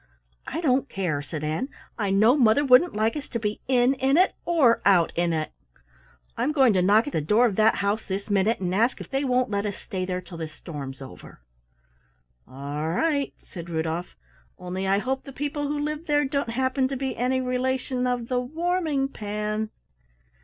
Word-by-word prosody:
"I 330 Hz, -, -3 dB
don't 270 Hz, -3 st, +1 dB
care," 170 Hz, -7 st, -2 dB
said 145 Hz, +2 st, -6 dB
Ann. 155 Hz, -, -2 dB, 0.3 s
"I 205 Hz, -3 st, -1 dB
know 215 Hz, +6 st, +5 dB
mother 255 Hz, +1 st, +4 dB
wouldn't 265 Hz, +5 st, +5 dB
like 220 Hz, +4 st, +1 dB
us 295 Hz, -1 st, -6 dB
to 235 Hz, -, -3 dB
be 210 Hz, -1 st, -3 dB
in 250 Hz, 0 st, +4 dB
in 270 Hz, +2 st, +2 dB
it 370 Hz, +2 st, +4 dB
or 295 Hz, -9 st, +4 dB
out 180 Hz, -4 st, +4 dB
in 175 Hz, 0 st, +1 dB
it. 155 Hz, -1 st, -2 dB, 0.8 s
I'm 300 Hz, -, 0 dB
going 265 Hz, -6 st, +5 dB
to 185 Hz, -, +3 dB
knock 205 Hz, +5 st, +4 dB
at 290 Hz, -, -6 dB
the -, -, +1 dB
door 210 Hz, +11 st, +3 dB
of 215 Hz, -5 st, 0 dB
that 220 Hz, 0 st, +4 dB
house 205 Hz, +2 st, -1 dB
this 195 Hz, 0 st, -3 dB
minute 205 Hz, +2 st, +1 dB
and 180 Hz, -1 st, -2 dB
ask 230 Hz, +6 st, +2 dB
if -, -, -10 dB
they 270 Hz, +1 st, 0 dB
won't 255 Hz, -3 st, +1 dB
let 200 Hz, 0 st, 0 dB
us 200 Hz, -, -4 dB
stay 185 Hz, -1 st, -5 dB
there 180 Hz, 0 st, -2 dB
till 175 Hz, -2 st, -10 dB
the 160 Hz, -, -3 dB
storm's 145 Hz, -4 st, -8 dB
over." 130 Hz, -, -13 dB, 1.1 s
"All 145 Hz, +4 st, -4 dB
right," 285 Hz, -, 0 dB
said 170 Hz, -2 st, -9 dB
Rudolf, 165 Hz, +2 st, -3 dB, 0.4 s
"only 185 Hz, +1 st, -4 dB
I 195 Hz, +1 st, +3 dB
hope 260 Hz, +5 st, -2 dB
the 275 Hz, -, -9 dB
people 290 Hz, +1 st, -3 dB
who 295 Hz, +1 st, -2 dB
live 300 Hz, +2 st, -3 dB
there 295 Hz, -1 st, +2 dB
don't 275 Hz, -2 st, -1 dB
happen 260 Hz, +2 st, 0 dB
to 270 Hz, 0 st, -4 dB
be 265 Hz, 0 st, -3 dB
any 255 Hz, +2 st, 0 dB
relation 255 Hz, 0 st, -1 dB
of 245 Hz, -2 st, -1 dB
the 250 Hz, 0 st, 0 dB
Warming 315 Hz, +1 st, -1 dB
pan." 215 Hz, -2 st, -3 dB
230 Hz, 195 wpm, -25 LUFS, 190-270 Hz, 1.1 s, know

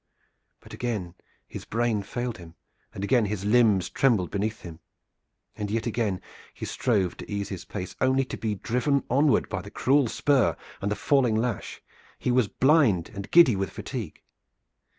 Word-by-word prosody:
But -, -, -14 dB
again 105 Hz, -8 st, -3 dB, 0.3 s
his -, -, -8 dB
brain 115 Hz, -2 st, 0 dB
failed 120 Hz, +2 st, -4 dB
him 85 Hz, -1 st, -12 dB, 0.4 s
and 95 Hz, -, -7 dB
again 120 Hz, +2 st, +3 dB
his 100 Hz, -1 st, -3 dB
limbs 105 Hz, -5 st, +4 dB
trembled 110 Hz, -10 st, +1 dB
beneath 105 Hz, +2 st, -2 dB
him, 85 Hz, -2 st, -10 dB, 0.8 s
and 105 Hz, -1 st, -4 dB
yet 110 Hz, +1 st, -1 dB
again 110 Hz, -5 st, -1 dB, 0.3 s
he -, -, -6 dB
strove 100 Hz, -8 st, 0 dB
to -, -, -9 dB
ease 100 Hz, -1 st, -3 dB
his 95 Hz, -3 st, -6 dB
pace, 95 Hz, -3 st, -6 dB
only 130 Hz, 0 st, +3 dB
to -, -, -6 dB
be 105 Hz, 0 st, -2 dB
driven 125 Hz, +7 st, 0 dB
onward 140 Hz, +2 st, +3 dB
by -, -, -3 dB
the -, -, -10 dB
cruel 140 Hz, 0 st, +2 dB
spur 135 Hz, +1 st, +2 dB, 0.2 s
and 100 Hz, -, -1 dB
the -, -, +1 dB
falling 130 Hz, -5 st, +2 dB
lash. 115 Hz, -1 st, -3 dB, 0.3 s
He 125 Hz, -, -1 dB
was 125 Hz, -3 st, +3 dB
blind 130 Hz, -, +3 dB
and 100 Hz, 0 st, -7 dB
giddy 165 Hz, -10 st, +7 dB
with 95 Hz, -2 st, -2 dB
fatigue. -, -, -7 dB
110 Hz, 170 wpm, -26 LUFS, 100-125 Hz, 0.8 s, giddy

